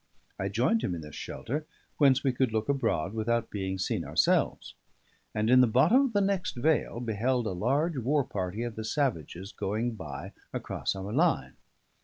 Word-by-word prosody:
I 95 0 -1
joined 125 - +2
him 90 - -1
in 85 - -6
this 75 -1 -10
shelter, 150 +5 -5 0.3
whence 135 -3 +5
we 135 - +3
could 125 -1 +1
look 110 0 -1
abroad 115 - 0
without 115 +1 -1
being 95 -2 -3
seen 95 - -1
ourselves; - - +1 0.6
and 105 +1 +1
in 130 +2 +7
the 125 - +5
bottom 175 - +5
of 235 - -8
the 205 - +3
next 195 -4 0
vale 145 -2 +1
beheld 120 +2 0
a 110 - -1
large 135 - 0
war 140 +4 +2
party 100 -1 -3
of 120 -1 -4
the 110 - -5
savages 105 - -2
going 110 +5 -2
by 80 -1 -7 0.2
across - - -2
our 95 +2 -5
line. 160 +3 +2
115 Hz, 180 wpm, -29 LUFS, 100-140 Hz, 0.6 s, in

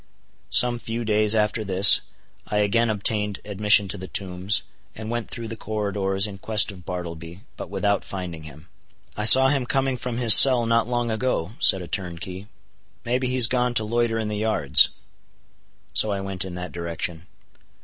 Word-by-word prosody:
Some 120 -1 +3
few 115 0 -6
days 105 0 +2
after 110 +1 -1
this, 95 0 +6 0.5
I 105 - -3
again 110 +3 0
obtained 105 -1 -2
admission 105 0 +3
to 100 - -5
the 95 - -8
Tombs, 95 +2 -3 0.3
and 110 +1 -8
went 120 -1 -5
through 115 -1 -8
the 115 - -7
corridors 100 -3 -3
in 100 -2 -8
quest 110 0 +1
of 90 -2 -14
Bartleby; 85 0 -8
but - - -9
without 100 -1 -2
finding 90 -4 -8
him. 75 +1 -14 0.5
"I 105 - -4
saw 130 +4 +7
him 135 -3 -2
coming 135 -1 -2
from 120 -1 -6
his 120 -3 +8
cell 125 -3 +8
not 115 0 0
long 120 -1 -3
ago," 110 -6 -3
said 95 -2 +4
a - - -10
turnkey, 90 +2 -7 0.6
"may 120 +2 -1
be 130 - -3
he's 125 -1 +3
gone 125 0 -2
to 110 - 0
loiter 115 +1 -2
in 110 -1 -4
the 105 0 -5
yards." 80 -10 +3 1.0
So 110 - +3
I 100 - -3
went 95 0 -6
in 90 -2 -9
that 90 -2 -8
direction. 85 0 -7
105 Hz, 180 wpm, -22 LUFS, 95-115 Hz, 1.0 s, his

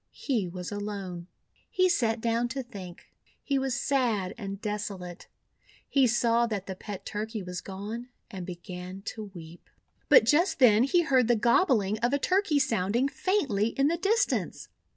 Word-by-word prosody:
He 230 -10 -1
was 180 +2 -6
alone. 200 -4 -5 0.4
He 370 0 +3
sat 230 -10 +1
down 235 +1 +1
to 260 +2 -4
think. 190 -7 -11 0.3
He 275 -1 0
was 265 -2 -1
sad 235 -9 0
and 195 -1 -6
desolate. 200 -4 -5 0.6
He 270 -2 +3
saw 235 0 +2
that 205 -4 -3
the 190 - -5
pet 195 0 -8
Turkey 215 0 -4
was 180 0 -5
gone 210 +6 -6 0.2
and 190 -4 -6
began 180 +1 -8
to 215 -2 -8
weep. 165 0 -12 0.4
But - - +8
just 335 +6 +3
then 240 -3 +6
he 345 +5 +3
heard 260 -6 +3
the 240 - +4
gobbling 225 - +2
of 240 +3 +1
a - - +4
Turkey 365 0 +1
sounding 240 -1 +1
faintly 280 - 0
in 275 +2 +3
the 335 - +1
distance. 430 +7 0
225 Hz, 160 wpm, -28 LUFS, 195-265 Hz, 0.6 s, But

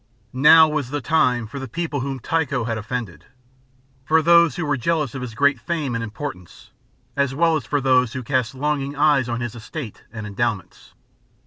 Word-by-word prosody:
Now 155 +5 +7
was 150 -5 -2
the 145 +2 -2
time 125 -5 +1
for 125 +6 -8
the 135 - -6
people 155 +2 -3
whom 135 0 -4
Tycho 150 -6 -1
had 115 0 -2
offended, 110 -3 -5 0.8
for 160 +3 +2
those 170 0 +5
who 175 - -3
were 145 -1 +1
jealous 150 0 -1
of 135 - -6
his 120 -3 -7
great 140 +1 +2
fame 155 -2 -3
and 115 0 -2
importance, 110 - -8 0.4
as 140 -2 0
well 165 +1 +3
as 155 - -3
for 145 - 0
those 130 -3 +2
who 130 -1 -5
cast 130 -1 -1
longing 140 0 -2
eyes 145 -4 +3
on 120 +1 -2
his 120 -2 -4
estate 120 +1 -8
and 110 -2 -7
endowments. 105 0 -4
135 Hz, 190 wpm, -22 LUFS, 120-150 Hz, 0.8 s, Now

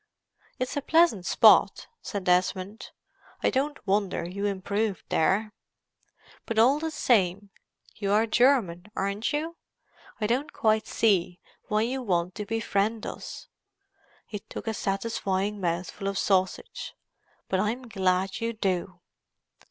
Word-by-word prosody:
"It's 255 - -3
a 285 - -1
pleasant 315 - +3
spot," - - +5 0.2
said 200 -3 -4
Desmond. 185 +4 0 0.5
"I - - +3
don't 285 +2 -2
wonder 195 -4 0
you 200 +3 -2
improved 200 +1 -2
there. 205 +7 +1 0.9
But 230 - -3
all 255 +6 +5
the 320 +1 -2
same, 205 - +1 0.5
you 200 -2 -1
are 215 +2 +4
German, 225 -7 +2
aren't 200 +3 -1
you? 320 +3 -3 0.6
I 215 - 0
don't 255 +7 0
quite 220 0 +1
see 185 -5 +1 0.3
why 215 +1 +1
you 260 +3 -2
want 180 -5 0
to 210 +1 -6
befriend 225 0 -1
us." - - -7 0.8
He 205 - -6
took - - -9
a 225 - -1
satisfying 200 -1 -2
mouthful 180 +3 -2
of 195 0 -2
sausage. 190 -2 -1 0.5
"But 190 - 0
I'm 235 +5 -1
glad 190 -2 0
you 230 0 -1
do." 185 -4 -2
205 Hz, 130 wpm, -27 LUFS, 190-230 Hz, 0.9 s, spot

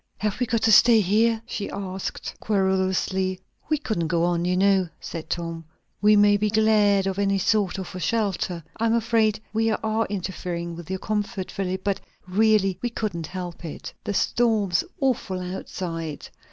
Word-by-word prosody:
"Have 210 +1 -2
we 245 - 0
got 225 -1 0
to 225 - +4
stay 230 +1 +7
here?" 220 +3 +2
she 215 -3 -4
asked 190 -1 -5
querulously. 190 -1 0 0.3
"We 305 - +3
couldn't 215 - -2
go 165 +1 +1
on, 175 0 +1
you 180 0 +1
know," 190 -2 +3
said 160 -1 -7
Tom. 165 -1 -3 0.4
"We 210 +1 +6
may 205 0 +5
be 210 +1 +1
glad 210 -2 +3
of 195 0 -2
any 200 -1 +2
sort 195 0 +1
of 190 -2 -6
a 185 - -5
shelter. 185 -2 -1
I 230 - +1
am 225 - +3
afraid 225 -2 +2
we 225 +1 +2
are 220 +1 0
interfering 175 -3 -4
with 170 -1 -10
your 190 - -1
comfort, 210 0 -3
Philip; 190 -1 -3
but 200 -2 0 0.3
really, 200 -1 +3
we 240 - -1
couldn't 190 -9 -3
help 180 -1 -6
it. 160 - -7
The 205 - -3
storm's 215 -8 +2 0.2
awful 245 -8 0
outside. 175 -3 -5
195 Hz, 170 wpm, -24 LUFS, 180-220 Hz, 0.4 s, stay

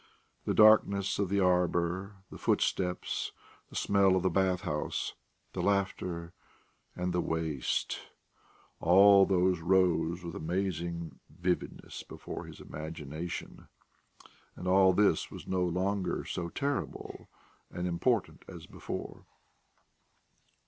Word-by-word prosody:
The - - 0
darkness 100 -3 +5
of 100 -3 0
the 100 0 +2
arbour, 90 +1 +1 0.2
the - - -9
footsteps, 90 -1 0 0.4
the - - -14
smell 100 -2 +3
of 95 - +1
the 95 - +2
bath 95 0 +1
house, 75 0 -2 0.4
the - - -2
laughter, 90 -4 -1 0.6
and 90 0 -2
the 90 - +1
waist 80 -5 -1 0.8
all 100 +3 +7
these 90 -2 +2
rose 85 -1 +2
with 85 -1 -6
amazing 85 0 -3
vividness 90 0 -3
before - - -8
his - - -11
imagination, 80 +2 -7 0.9
and 90 - -6
all 95 0 +6
this 100 -4 +2
was - - -9
no 95 -1 0
longer 95 +2 -1
so 85 -1 -4
terrible 140 +8 -4 0.4
and 90 - -4
important 95 +6 0
as - - -10
before. - - -7
90 Hz, 115 wpm, -31 LUFS, 85-95 Hz, 0.9 s, all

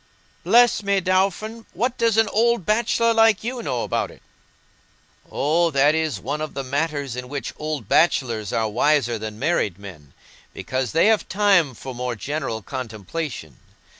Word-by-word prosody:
"Bless 240 -1 +4
me, 200 -1 +1
Dauphin, 195 +5 -1
what 245 +2 -1
does 230 -2 +1
an 225 -1 +4
old 230 -2 +1
bachelor 230 +1 +2
like 225 -3 +4
you 240 +1 -4
know 125 - -2
about - - -1
it?" - - -17 1.1
"Oh, 165 +4 +1
that 145 0 +3
is 160 -9 -1
one 145 +9 -4
of 155 - -5
the 140 - -3
matters 140 -1 -2
in 125 0 -6
which 145 0 -5
old 150 -8 -4
bachelors 120 - +1
are 110 -1 0
wiser 120 +1 +1
than 110 0 -6
married 125 - 0
men, 85 -9 -12 0.4
because 130 -2 -3
they 165 - +4
have 220 -1 +2
time 190 - +3
for 130 +3 -8
more 125 0 -3
general 135 -3 -4
contemplation. 110 - -6
150 Hz, 160 wpm, -22 LUFS, 120-200 Hz, 1.1 s, Bless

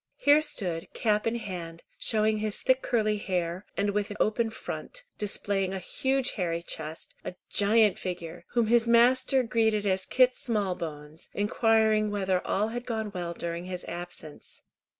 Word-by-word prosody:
Here 290 +1 +5
stood, 180 - -2
cap 215 -1 +1
in 225 - 0
hand, 175 -7 -6 0.2
showing 215 -1 +1
his 215 -1 -2
thick 260 0 +2
curly 215 -3 +1
hair, 180 -1 -2
and 205 +1 +1
with 205 0 -1
open 225 +1 +1
front, - - -6 0.2
displaying 195 -2 0
a - - -2
huge 265 +7 -1
hairy 170 -3 -2
chest, 160 -1 -6
a - - -6 0.2
giant 210 0 +4
figure, 175 -2 -6
whom 235 -2 +3
his 235 +1 +3
master 255 +3 +4
greeted 220 -3 +1
as 190 -1 0
Kit 255 0 +4
Smallbones, 170 - -3
inquiring 220 0 +3
whether 190 -3 0
all 210 +3 +1
had 240 +2 -5
gone 220 -3 -2
well 175 -2 -4
during 170 +1 -4
his 180 -1 -6
absence. 175 -3 -8
210 Hz, 150 wpm, -28 LUFS, 180-230 Hz, 0.2 s, Here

